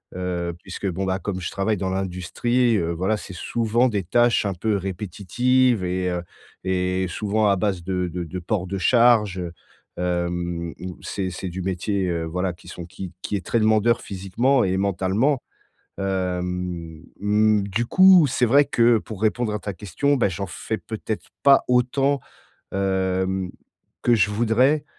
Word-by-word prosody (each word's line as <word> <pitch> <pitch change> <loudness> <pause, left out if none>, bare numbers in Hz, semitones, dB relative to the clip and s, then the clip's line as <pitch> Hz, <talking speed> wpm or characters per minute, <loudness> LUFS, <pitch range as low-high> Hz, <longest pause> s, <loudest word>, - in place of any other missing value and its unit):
Heu, 90 -1 -2
puisque, 95 +1 -7
bon, 95 +1 -2
bah, 95 0 0
comme 95 -2 -4
je 90 - -3
travaille 105 +2 0
dans 95 0 -2
l'industrie, 95 +6 0
heu, 85 -3 -1
voilà, 95 +6 0
c'est 100 - -9
souvent 115 +6 +1
des 100 -4 -1
tâches 120 +6 +3
un 100 - 0
peu 105 +4 -1
répétitives 105 +5 +1
et 90 0 -1
heu, 90 0 -2 0.4
et 95 0 0
souvent 105 +4 0
à 100 - +4
base 95 -2 -1
de 90 0 -1
de 90 +1 -4
de 85 +3 -6
port 90 +1 -2
de 100 +2 -3
charge, 110 -1 +4
heu, 85 -2 -4 0.5
hem 85 -1 -2
où 90 -1 -7
c'est 95 -2 -3
c'est 90 +1 -5
du 90 +1 -5
métier, 95 +1 -1
heu, 85 -1 -1
voilà, 90 +2 -2
qui 85 0 -18
sont 90 -1 -8
qui 95 +1 -8
qui - - -2
est 95 - -3
très 115 - +1
demandeur 110 +1 +3
physiquement 115 +8 +1
et 95 0 0
mentalement. 100 +8 +1 0.6
Hem, 90 -3 -3 0.2
mmh, 105 0 +3
du 110 +5 -1
coup, 185 +3 +7
c'est 125 -1 +1
vrai 140 +5 +5
que, 120 -4 +3
pour 105 -2 -9
répondre 110 0 +1
à 105 - -2
ta 100 0 -5
question, 105 - 0
bah, 120 -7 +2
j'en 100 +1 -4
fais 110 +5 -4
peut-être 110 -1 -5 0.2
pas 140 -1 +6
autant, 135 +3 +2 0.5
hem, 95 -1 0 0.5
que 120 - +4
je 105 -2 +3
voudrais 120 +7 +2
95 Hz, 170 wpm, -23 LUFS, 90-110 Hz, 0.6 s, coup